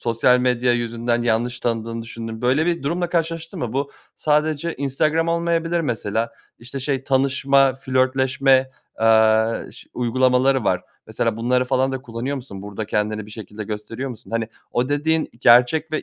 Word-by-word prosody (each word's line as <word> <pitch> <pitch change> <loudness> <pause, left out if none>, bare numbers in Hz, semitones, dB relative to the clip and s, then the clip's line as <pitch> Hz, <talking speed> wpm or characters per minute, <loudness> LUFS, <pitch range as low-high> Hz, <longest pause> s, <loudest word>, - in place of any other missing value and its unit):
sosyal 115 +2 +3
medya 125 -1 +2
yüzünden 120 0 -1
yanlış 120 +1 0
tanıdığını 115 0 -2
düşündüğün 115 0 -7
böyle 135 +6 +2
bir 170 -3 0
durumla 170 +5 -1
karşılaştın 165 -1 -2
mı? 120 -2 -3
Bu 140 +1 -2 0.3
sadece 155 +2 0
Instagram 155 +4 0
olmayabilir 170 0 0
mesela, 115 -5 -2 0.3
işte, 125 +4 -7
şey 135 0 -2
tanışma, 135 0 +3
flörtleşme, 130 0 +2 0.3
aaa, 110 0 +3
ş - - -15
uygulamaları 130 +1 +2
var. - - +1 0.2
Mesela - - -1
bunları 125 +2 +1
falan 130 +1 +1
da 130 -1 -4
kullanıyor 125 +3 -4
musun? 100 -7 -9
Burada 105 +1 -6
kendini 105 0 -1
bir - - -13
şekilde 105 0 -8
gösteriyor 115 +5 -5
musun? 115 - -12
Hani, 115 0 -1 0.2
o 125 +1 0
dediğin 155 +2 +1
i - - -22
gerçek 125 +7 +5
ve 155 - -1
130 Hz, 155 wpm, -21 LUFS, 115-140 Hz, 0.3 s, gerçek